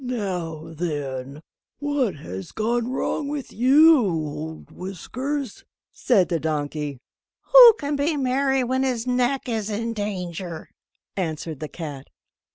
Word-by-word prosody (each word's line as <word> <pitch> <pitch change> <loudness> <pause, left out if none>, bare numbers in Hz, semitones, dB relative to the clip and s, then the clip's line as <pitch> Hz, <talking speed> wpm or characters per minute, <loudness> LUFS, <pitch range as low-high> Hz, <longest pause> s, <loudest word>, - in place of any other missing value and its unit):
"Now 185 -10 -3
then, 145 -3 -4 0.3
what 290 -6 0
has 95 -9 -8
gone 235 +2 -1
wrong 275 +2 -2
with 285 -2 -5
you 290 +6 +6
old 160 -6 -3
Whiskers?" 255 - -5 0.3
said 195 -8 +2
the 170 -2 0
donkey. 150 -2 -3 0.6
"Who - - +11
can 290 0 -2
be 295 +2 0
merry 270 0 +1
when 260 +2 0
his 250 -3 -1
neck 250 +2 0
is 220 -3 -2
in 230 +2 -2
danger?" 180 -5 -5 0.5
answered 160 -4 -3
the 155 - -4
cat. 145 -5 -7
210 Hz, 125 wpm, -24 LUFS, 160-260 Hz, 0.6 s, Who